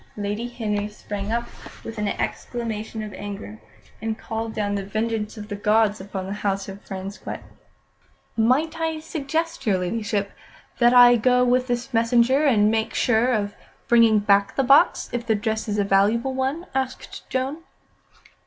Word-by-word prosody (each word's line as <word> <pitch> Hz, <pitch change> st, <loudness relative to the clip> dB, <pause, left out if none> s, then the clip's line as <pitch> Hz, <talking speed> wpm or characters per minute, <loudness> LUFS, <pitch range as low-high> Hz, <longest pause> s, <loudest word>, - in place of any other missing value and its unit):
Lady 205 Hz, +3 st, -3 dB
Henry 210 Hz, -4 st, -2 dB
sprang 205 Hz, 0 st, -6 dB
up 235 Hz, +1 st, -1 dB, 0.4 s
with 225 Hz, -1 st, -7 dB
an 210 Hz, -, 0 dB
exclamation 220 Hz, 0 st, -4 dB
of 210 Hz, -2 st, -7 dB
anger, 205 Hz, +2 st, -7 dB, 0.4 s
and 220 Hz, 0 st, -2 dB
called 225 Hz, 0 st, -4 dB
down 205 Hz, -2 st, -2 dB
the 200 Hz, -1 st, -2 dB
vengeance 215 Hz, +2 st, -2 dB
of 210 Hz, -1 st, -7 dB
the 205 Hz, -, -4 dB
gods 210 Hz, 0 st, +2 dB
upon 190 Hz, -1 st, -5 dB
the 195 Hz, -, -4 dB
house 195 Hz, -1 st, -1 dB
of 195 Hz, 0 st, -9 dB
Frasquet. 195 Hz, +1 st, -7 dB, 1.0 s
"Might 270 Hz, +9 st, +2 dB
I 320 Hz, -1 st, -1 dB
suggest, 315 Hz, -2 st, -3 dB
your 195 Hz, -3 st, +3 dB
Ladyship, 200 Hz, +2 st, -2 dB, 0.5 s
that 240 Hz, 0 st, +5 dB
I 245 Hz, 0 st, +8 dB
go 250 Hz, +2 st, +3 dB
with 250 Hz, +1 st, +2 dB
the 240 Hz, -1 st, -1 dB
messenger, 235 Hz, +4 st, +3 dB
and 215 Hz, -6 st, +4 dB
make 220 Hz, 0 st, -1 dB
sure 245 Hz, +1 st, +2 dB
of 205 Hz, -3 st, -1 dB, 0.3 s
bringing 230 Hz, -2 st, +5 dB
back 200 Hz, -1 st, +2 dB
the 270 Hz, -, +2 dB
box, 275 Hz, +3 st, +4 dB
if 240 Hz, -1 st, -3 dB
the 220 Hz, -, +3 dB
dress 220 Hz, +1 st, -2 dB
is 210 Hz, -1 st, -1 dB
a 205 Hz, -, +2 dB
valuable 205 Hz, +6 st, +2 dB
one?" 265 Hz, +6 st, -2 dB
asked 265 Hz, -1 st, -4 dB
Joan. 260 Hz, +3 st, -1 dB
220 Hz, 160 wpm, -23 LUFS, 205-245 Hz, 1.0 s, I